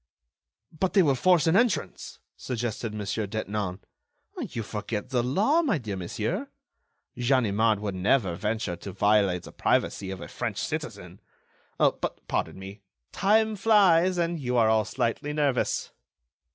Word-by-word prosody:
"But 180 +4 -2
they 195 -2 +6
will 145 -4 +3
force 175 +5 +3
an 165 +2 +3
entrance," 205 - 0 0.2
suggested 120 -2 -4
Mon. 105 -1 -5
Detinan. 105 -2 -3 0.7
"You 115 - -4
forget 105 +2 -4
the 125 -2 +2
law, 205 - +2
my 295 - +1
dear 110 -7 -5
monsieur! 90 -2 -3 0.7
Ganimard 115 -4 +2
would 105 -2 -3
never 95 +1 +1
venture 105 0 -2
to 95 +2 -8
violate 100 -2 +2
the - - -11
privacy 95 - 0
of 95 -1 -5
a - - -8
French - - -4
citizen. - - -5 0.6
But, - - 0
pardon - - -2
me, 95 +2 -10 0.3
time 220 +2 +2
flies, 185 -4 +4
and 170 -1 0
you 125 -3 -1
are 115 -2 +4
all 110 -1 +3
slightly 130 +4 -2
nervous." 145 -4 0
115 Hz, 140 wpm, -27 LUFS, 105-165 Hz, 0.7 s, they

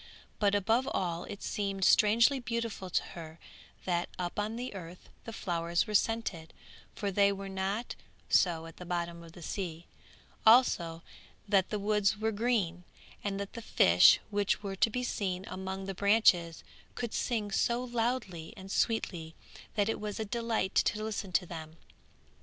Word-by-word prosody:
But 205 -1 +3
above 225 +6 +2
all 175 -2 -1
it 200 - -8
seemed 195 -2 -1
strangely 230 +6 +5
beautiful 230 -5 -3
to - - +1
her 160 -1 -9 0.5
that 175 -1 0
up 180 +2 -3
on 215 +2 -2
the 245 0 -5
earth 180 -2 -10 0.2
the 230 - -6
flowers 170 -4 -1
were 215 - -6
scented, 205 -7 0 0.4
for 200 -1 -2
they 200 +1 +4
were 195 0 -5
not 195 +4 -2 0.3
so 165 -3 +3
at 165 - -11
the - - -8
bottom 170 -1 -3
of 165 -1 -13
the 175 - -11
sea; 170 -2 -4 0.6
also 175 -8 +4 0.4
that 195 -2 +3
the 210 - -1
woods 210 0 +1
were 220 +1 0
green, 205 -6 0 0.4
and 200 -1 -2
that 200 0 -5
the 230 - -6
fish - - +6
which 205 0 0
were 195 -1 -4
to 210 - +3
be 250 +3 -2
seen 190 -6 -2
among 190 +1 -5
the 195 - -4
branches 190 -5 +3 0.3
could 235 -2 -4
sing 220 -4 -1
so 235 +5 +1
loudly 230 -9 -2
and 190 0 -9
sweetly 175 -9 -1 0.4
that 205 -2 +2
it 225 - -1
was 210 0 -4
a 220 - -1
delight 230 -3 -1
to 215 - +2
listen 215 -3 -4
to 180 0 +2
them. 160 -2 -8
200 Hz, 165 wpm, -31 LUFS, 175-220 Hz, 0.6 s, fish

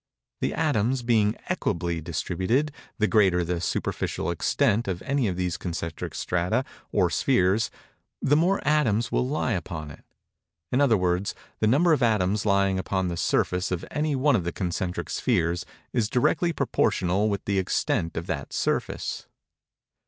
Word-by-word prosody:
The - - -1
atoms 130 -5 +1
being 110 -3 +3
equably 85 -1 -1
distributed, 95 - -1 0.3
the 110 - +2
greater 95 -4 +3
the 85 0 -2
superficial 85 -1 -2
extent 115 - +1
of 90 -2 -3
any 135 -3 +1
of 90 - -1
these 90 -1 -1
concentric 85 -3 -5
strata, 90 +9 0 0.3
or - - +2
spheres, 95 +5 +2 0.5
the 145 - +3
more 180 +6 +2
atoms 120 -7 +2
will 125 - +1
lie 140 -2 -1
upon 85 -6 -4
it. - - -14 0.7
In 130 - +2
other 125 -6 +4
words, 90 +1 0 0.2
the 110 - +2
number 155 +9 +4
of 145 - +1
atoms 105 -3 +2
lying 100 -1 +3
upon 95 -1 -1
the 85 - -3
surface 90 +2 0
of 90 -2 -3
any 150 -1 0
one 135 +1 +3
of 95 - +1
the 85 - -2
concentric 90 -1 -3
spheres, 85 +1 0 0.3
is 115 -4 +1
directly 150 +8 +2
proportional 100 - +1
with 100 -1 -3
the 100 -1 +1
extent 85 -3 -1
of 85 - -3
that - - -4
surface. - - -2
100 Hz, 155 wpm, -26 LUFS, 90-125 Hz, 0.7 s, other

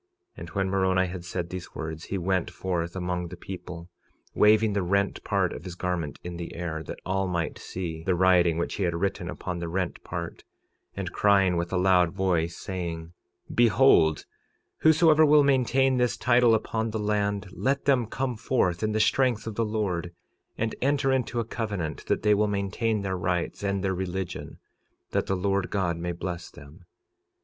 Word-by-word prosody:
46:19 - - -11
And - - -8
when 95 -1 -1
Moroni 95 -1 +2
had 90 -1 -6
said 90 -1 -4
these 90 -1 -7
words, 80 +1 -5
he 100 - -3
went 90 -1 0
forth 85 -1 -3
among 90 -1 -2
the 90 - -9
people, 90 -2 -8 0.5
waving 105 0 +4
the 100 - +1
rent 100 +2 0
part - - 0
of - - -8
his 90 - -7
garment 90 -5 -3
in 85 -1 -6
the 85 -1 -7
air, 85 -2 -4
that - - -7
all 95 +1 0
might 85 -3 -2
see 85 -3 -5
the 90 +1 +1
writing 90 -2 +4
which 85 - -2
he 100 - -2
had 85 -2 0
written 95 +3 -2
upon 90 -1 -5
the 85 - -4
rent 90 +1 -3
part, - - -6 0.5
and - - -3
crying 100 -3 +4
with 85 0 -2
a 95 - 0
loud 90 -2 +3
voice, 85 -4 0
saying: 85 -3 -5 0.4
46:20 - - -8
Behold, 115 - +5 0.5
whosoever 160 0 +5
will 150 -1 +6
maintain 135 -1 +3
this 125 -1 +1
title 120 -2 +4
upon 110 +1 -2
the 110 - -3
land, 105 -2 -1
let 135 +7 -1
them 130 -5 +3
come 130 +2 -2
forth 90 -7 0
in 110 0 0
the 110 - +1
strength 120 -1 +2
of 110 - -4
the 115 - 0
Lord, 100 -6 -2 0.5
and 115 0 -1
enter 135 0 +2
into 125 -2 0
a 115 - -1
covenant 100 -10 -4
that - - 0
they 105 -1 +5
will 105 +1 +2
maintain 105 +2 -1
their 95 -1 -1
rights, 90 -1 -2
and 100 -1 -1
their 95 -1 +1
religion, 95 0 -4 0.5
that - - 0
the 95 - +1
Lord 95 0 0
God 90 -4 0
may 85 +1 -3
bless 85 0 -5
them. 75 +5 -15
95 Hz, 190 wpm, -27 LUFS, 85-110 Hz, 0.5 s, will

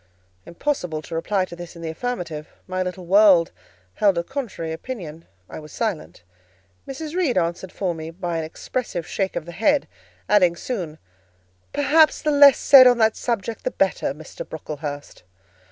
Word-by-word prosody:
Impossible 180 - -2
to - - -10
reply 185 +4 0
to 175 - -10
this 175 0 -10
in 170 - -10
the 165 - -3
affirmative: 170 -7 -5 0.2
my 185 0 -3
little 180 0 -4
world 190 -2 +5 0.4
held 200 - +2
a 170 - 0
contrary 225 - -5
opinion: 165 -6 -7 0.2
I - - -8
was 155 -1 -12
silent. 165 - -4 0.6
Mrs. 300 +3 -6
Reed 325 - +1
answered 175 +1 -1
for 185 -3 -2
me 160 -1 -7
by 170 -1 -4
an - - -3
expressive 175 +2 -4
shake 195 +1 -2
of 160 - -3
the 170 - -8
head, 250 - +1 0.4
adding 180 -5 +4
soon, 175 -7 -5 0.7
"Perhaps 305 +2 +3
the 305 - +2
less 285 -2 +7
said 260 -2 +8
on 245 -1 +5
that 220 -1 +3
subject 230 -2 -3
the - - 0
better, - - 0
Mr. - - -9
Brocklehurst." 145 - -7
185 Hz, 165 wpm, -22 LUFS, 165-245 Hz, 0.7 s, said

